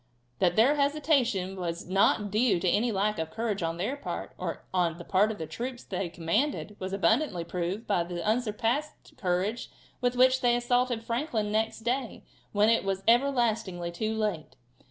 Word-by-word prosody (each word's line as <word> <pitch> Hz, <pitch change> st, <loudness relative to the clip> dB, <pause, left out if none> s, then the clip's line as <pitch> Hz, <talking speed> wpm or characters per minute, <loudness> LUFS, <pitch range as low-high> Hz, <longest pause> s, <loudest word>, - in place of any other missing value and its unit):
That 175 Hz, -2 st, +3 dB
their 260 Hz, +7 st, +4 dB
hesitation 275 Hz, -, +1 dB
was 170 Hz, -2 st, -4 dB
not 195 Hz, +2 st, +2 dB
due 215 Hz, -3 st, +3 dB
to 185 Hz, -, -1 dB
any 230 Hz, +7 st, +2 dB
lack 205 Hz, -1 st, 0 dB
of 160 Hz, 0 st, -2 dB
courage 220 Hz, +1 st, -2 dB
on 165 Hz, 0 st, -2 dB
their 210 Hz, +10 st, -1 dB
part, 285 Hz, -, -6 dB
or -, -, -5 dB
on 175 Hz, -3 st, +1 dB
the 170 Hz, -, -8 dB
part 200 Hz, +4 st, +3 dB
of 215 Hz, -, -6 dB
the 160 Hz, -, -4 dB
troops 245 Hz, +8 st, -6 dB
they 185 Hz, -2 st, -3 dB
commanded, 210 Hz, -, -1 dB
was 185 Hz, 0 st, -4 dB
abundantly 200 Hz, -, +1 dB
proved 180 Hz, +5 st, -3 dB
by 195 Hz, -4 st, +1 dB
the 175 Hz, 0 st, -5 dB
unsurpassed 235 Hz, +5 st, -1 dB
courage 190 Hz, +5 st, -1 dB, 0.3 s
with 245 Hz, 0 st, +1 dB
which 255 Hz, +1 st, +4 dB
they 240 Hz, -1 st, +4 dB
assaulted 245 Hz, -1 st, +1 dB
at -, -, -21 dB
Franklin 230 Hz, -4 st, -1 dB
next 220 Hz, +1 st, 0 dB
day 245 Hz, +1 st, -2 dB, 0.3 s
when 210 Hz, +1 st, +3 dB
it 230 Hz, 0 st, +3 dB
was 195 Hz, 0 st, -2 dB
everlastingly 230 Hz, -8 st, +2 dB
too 215 Hz, +5 st, -2 dB
late. 210 Hz, -8 st, -2 dB
215 Hz, 175 wpm, -28 LUFS, 185-245 Hz, 0.3 s, their